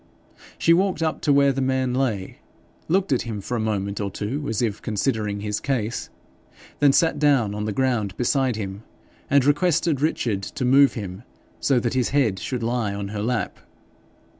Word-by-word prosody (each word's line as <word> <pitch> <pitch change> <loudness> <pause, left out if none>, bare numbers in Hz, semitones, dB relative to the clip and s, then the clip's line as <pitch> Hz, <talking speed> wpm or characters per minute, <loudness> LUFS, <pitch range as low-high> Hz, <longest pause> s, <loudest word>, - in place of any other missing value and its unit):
She 165 - +4
walked 185 -1 +1
up 160 -1 -1
to 150 - +2
where 140 -1 +4
the 135 - -2
man 130 -1 0
lay, 120 -8 -2 0.5
looked 185 0 +1
at 130 - +2
him 110 -3 -5
for 120 +5 -4
a - - -1
moment 100 -2 -2
or 100 - -2
two 125 +9 -4
as 110 - -1
if 105 -3 -2
considering 105 -2 -1
his 105 0 -2
case, 120 -5 -2 0.7
then 145 -1 +5
sat 160 +2 +2
down 135 -8 +3
on 105 0 -3
the 105 - -1
ground 110 -5 0
beside 130 0 +1
him, 100 -1 -5 0.5
and 140 -2 +4
requested 160 0 +2
Richard 120 -10 0
to 125 +6 -4
move 135 +2 +5
him 95 -3 -6 0.4
so 135 -3 +2
that 120 0 -1
his 130 -2 +1
head 120 -9 +1
should 125 -3 -3
lie 115 -3 -1
on 100 -1 -4
her 105 0 -4
lap. 115 -3 -2
125 Hz, 185 wpm, -23 LUFS, 105-140 Hz, 0.7 s, then